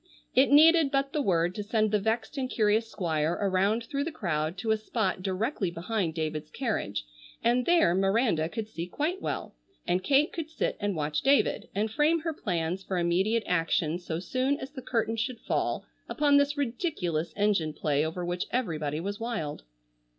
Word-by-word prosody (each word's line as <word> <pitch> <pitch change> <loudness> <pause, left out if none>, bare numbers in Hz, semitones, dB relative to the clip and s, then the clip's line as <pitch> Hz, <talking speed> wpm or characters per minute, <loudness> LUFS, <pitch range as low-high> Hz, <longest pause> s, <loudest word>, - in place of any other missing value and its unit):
It 265 -1 +5
needed 315 +1 +7
but 275 0 0
the 300 - +1
word 175 -6 +1
to 210 - -4
send 215 0 +1
the 210 - +3
vexed 220 +6 -1
and 260 -2 -2
curious 220 0 +2
Squire 160 -5 0
around 200 +3 +1
through 280 +4 -2
the 330 - -3
crowd 170 - -2
to 220 +4 -1
a 220 - +3
spot 215 -3 -2
directly 195 +2 -1
behind 175 0 -2
David's 155 -1 -3
carriage, 155 - -2 0.4
and 240 +2 +2
there 340 - +5
Miranda 195 -3 +2
could 220 +2 -4
see 175 -5 -5
quite 315 - -2
well, - - -4 0.3
and 180 +1 0
Kate 285 +2 +3
could 325 -3 -4
sit 320 - -1
and 205 -2 -1
watch 150 -1 -1
David 275 +1 +2
and 210 +2 0
frame 310 +7 +2
her 325 0 -2
plans 180 - -2
for 190 -1 -3
immediate 190 +7 +1
action 165 -1 +1
so 170 -2 -4
soon 255 +10 0
as 270 - -7
the 275 -3 -8
curtain 230 -2 -1
should 235 +1 -2
fall - - -1 0.2
upon 290 -1 +3
this 285 +1 +2
ridiculous 230 - -1
engine 200 -6 +1
play 150 -1 0
over 165 +3 -3
which 175 +1 -2
everybody 155 - -1
was 200 +4 -4
wild. 225 - -4
210 Hz, 180 wpm, -28 LUFS, 170-260 Hz, 0.4 s, needed